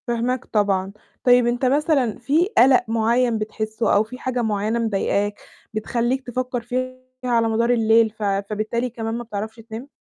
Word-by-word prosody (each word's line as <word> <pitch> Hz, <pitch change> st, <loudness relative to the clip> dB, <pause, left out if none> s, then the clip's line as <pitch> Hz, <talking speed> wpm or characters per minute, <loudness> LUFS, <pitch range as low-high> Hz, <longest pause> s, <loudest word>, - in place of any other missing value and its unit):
فاهماك 240 Hz, +2 st, -1 dB
طبعًا، 195 Hz, -3 st, 0 dB, 0.3 s
طيب 245 Hz, -1 st, +5 dB
أنت 245 Hz, +2 st, 0 dB
مثلًا 275 Hz, -4 st, +1 dB
في 300 Hz, +9 st, +2 dB
قَلَق 255 Hz, 0 st, +6 dB
معيّن 230 Hz, +1 st, +1 dB
بتحسه، 215 Hz, +1 st, -2 dB
أو 205 Hz, -, +4 dB
في 240 Hz, +3 st, -10 dB
حاجة 255 Hz, -2 st, -2 dB
معيّنة 215 Hz, +1 st, -1 dB
مضايقاك، 205 Hz, -1 st, -1 dB, 0.3 s
بتخلّيك 240 Hz, +4 st, -1 dB
تفكّر 250 Hz, 0 st, -2 dB
فيها 255 Hz, +2 st, -3 dB, 0.3 s
على 235 Hz, -2 st, +2 dB
مدار 230 Hz, +2 st, +1 dB
الليل، 225 Hz, -1 st, +4 dB
ف 215 Hz, 0 st, -9 dB
فبالتالي 210 Hz, +4 st, -1 dB
كمان 225 Hz, -1 st, -4 dB
ما 240 Hz, +1 st, -4 dB
بتعرفش 220 Hz, -1 st, -5 dB
تنام؟ 225 Hz, +3 st, -9 dB
230 Hz, 155 wpm, -22 LUFS, 215-250 Hz, 0.3 s, قَلَق